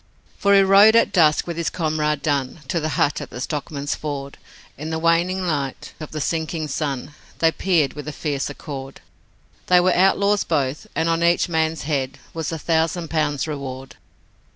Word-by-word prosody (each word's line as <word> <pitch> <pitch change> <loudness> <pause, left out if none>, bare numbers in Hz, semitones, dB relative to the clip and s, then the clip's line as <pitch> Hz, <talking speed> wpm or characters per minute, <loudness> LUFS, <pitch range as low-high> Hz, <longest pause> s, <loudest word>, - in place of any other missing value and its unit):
For 200 0 +4
he 195 - +7
rode 200 +3 +7
at 230 - +4
dusk, 155 -4 +4
with 170 -1 -5
his 170 - 0
comrade 155 -3 -1
Dunn 140 0 -1
To 175 - 0
the 155 0 -2
hut 145 - +1
at - - -7
the 120 - -8
Stockman's 145 +1 -3
Ford, 140 -2 -6 0.4
In 155 +3 -6
the 160 - -2
waning 170 +3 +1
light 145 -5 -3
of 155 - -7
the 155 - -5
sinking 160 +1 -2
sun 140 -1 -3 0.2
They 165 0 +3
peered 165 -6 +1
with 150 0 -8
a - - -3
fierce 145 -2 -3
accord. 135 -2 -8 0.7
They 180 0 +6
were 180 +1 +3
outlaws 200 +2 +3
both 145 -3 -1
and 160 - +1
on 165 0 +1
each 170 +2 +3
man's 160 -1 0
head 135 -3 -2 0.2
Was 160 -1 -3
a 165 - -3
thousand 165 +1 0
pounds 150 -2 0
reward. 135 -3 -6
155 Hz, 180 wpm, -22 LUFS, 145-170 Hz, 0.7 s, he